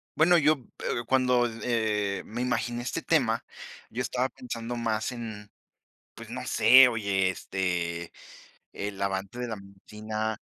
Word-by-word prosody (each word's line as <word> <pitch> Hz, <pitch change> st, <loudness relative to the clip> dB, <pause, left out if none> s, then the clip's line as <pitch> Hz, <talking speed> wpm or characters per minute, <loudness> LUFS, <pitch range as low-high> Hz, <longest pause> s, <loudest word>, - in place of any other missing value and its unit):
bueno, 175 Hz, +3 st, +5 dB
yo, 155 Hz, -1 st, +5 dB, 0.3 s
eh, 120 Hz, -, -1 dB
cuando, 125 Hz, -2 st, +3 dB, 0.2 s
eh, 105 Hz, -4 st, 0 dB
me 115 Hz, +3 st, -5 dB
imaginé 120 Hz, -1 st, -1 dB
este 125 Hz, -, -3 dB
tema, -, -, +2 dB, 0.5 s
yo 120 Hz, -, -3 dB
estaba 130 Hz, +1 st, -1 dB
pensando 120 Hz, -2 st, -6 dB
más 110 Hz, -1 st, -1 dB
en, 110 Hz, -4 st, -7 dB, 0.7 s
pues, -, -, -11 dB
no -, -, -5 dB
sé, 130 Hz, +1 st, +8 dB
oye, 100 Hz, -5 st, +1 dB
este, 90 Hz, -3 st, -2 dB, 0.6 s
el 100 Hz, -1 st, -5 dB
amante 100 Hz, +3 st, -2 dB
de 125 Hz, -, -3 dB
la 110 Hz, -, -3 dB
medicina 105 Hz, +2 st, -5 dB
110 Hz, 135 wpm, -28 LUFS, 100-125 Hz, 0.7 s, sé